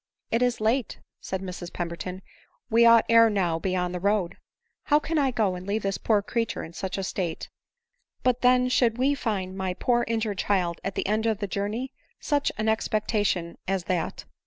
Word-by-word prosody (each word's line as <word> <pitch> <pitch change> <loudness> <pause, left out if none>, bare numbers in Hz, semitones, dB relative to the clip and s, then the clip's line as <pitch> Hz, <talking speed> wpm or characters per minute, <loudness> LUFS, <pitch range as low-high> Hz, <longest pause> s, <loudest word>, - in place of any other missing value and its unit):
" - - -48
It 235 - +1
is 245 -1 +1
late," 225 +2 0 0.2
said 190 0 -4
Mrs 180 -2 -6
Pemberton—" 180 +2 -5 0.5
we 235 +1 +6
ought 230 -1 +7
ere 230 0 +6
now 180 -6 +1
to - - -10
be 185 +1 -1
on 180 -1 -1
the 180 - -4
road." 200 -2 0 0.3
" - - -51
How 295 - +4
can 310 +1 -1
I 275 -2 +3
go, 220 -6 +1
and 180 +1 -7
leave 210 +2 -1
this 195 -1 -1
poor 210 -3 +2
creature 230 +1 -2
in 165 - -9
such 190 +2 -4
a 195 - -2
state? 180 -3 -3 0.4
— 485 0 -48
But 250 -1 +2
then 250 0 +4
should 240 -2 +2
we 270 +3 +2
find 195 -8 -2
my 190 -1 -2
poor 240 +3 +1
injured 220 -3 -1
child 180 -4 0
at 195 -1 -3
the - - -1
end 215 +3 +1
of 220 -2 +1
the 205 - -3
journey! 205 +7 -3 0.3
43uch 290 -2 +1
an 215 +1 -1
expectation 210 -5 0
as 190 -1 0
that 175 -1 -2
210 Hz, 210 wpm, -26 LUFS, 185-235 Hz, 0.5 s, ought